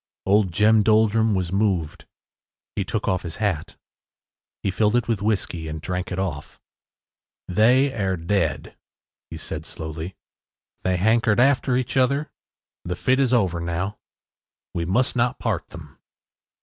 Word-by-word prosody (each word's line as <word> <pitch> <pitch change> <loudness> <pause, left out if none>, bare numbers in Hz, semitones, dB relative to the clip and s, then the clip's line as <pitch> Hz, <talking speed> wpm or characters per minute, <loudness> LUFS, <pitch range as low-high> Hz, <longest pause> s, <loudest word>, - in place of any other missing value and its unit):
Old 100 -1 +3
Jem 105 +4 +4
Doldrum 110 0 +3
was 90 -2 -1
moved. 95 -7 0 0.7
He - - 0
took - - -3
off 95 - +1
his 85 -3 -6
hat. 100 -7 -2 0.9
He 95 - +1
filled 105 +3 +2
it 120 -1 +1
with 110 -4 -1
whiskey 95 -6 -1
and 80 0 -5
drank 90 +3 -4
it 90 - -3
off. 90 -7 -4 0.9
“They 125 +8 +4
air 95 -6 -1
dead,” 85 -1 -1 0.5
he - - -7
said 75 - -5
slowly, 80 +3 -7 0.7
“they 95 0 0
hankered 110 +3 +3
after 130 -1 +3
each 130 +1 -2
other. 140 +3 +2 0.5
The 90 0 -3
fit 130 +8 +1
is 135 -3 +2
over 95 -9 +2
now. 85 +4 -3 0.7
We 85 - -2
must 120 +10 +1
not 125 +1 +1
part 105 -7 -2
them. 75 -3 -12
100 Hz, 145 wpm, -23 LUFS, 85-115 Hz, 0.9 s, Jem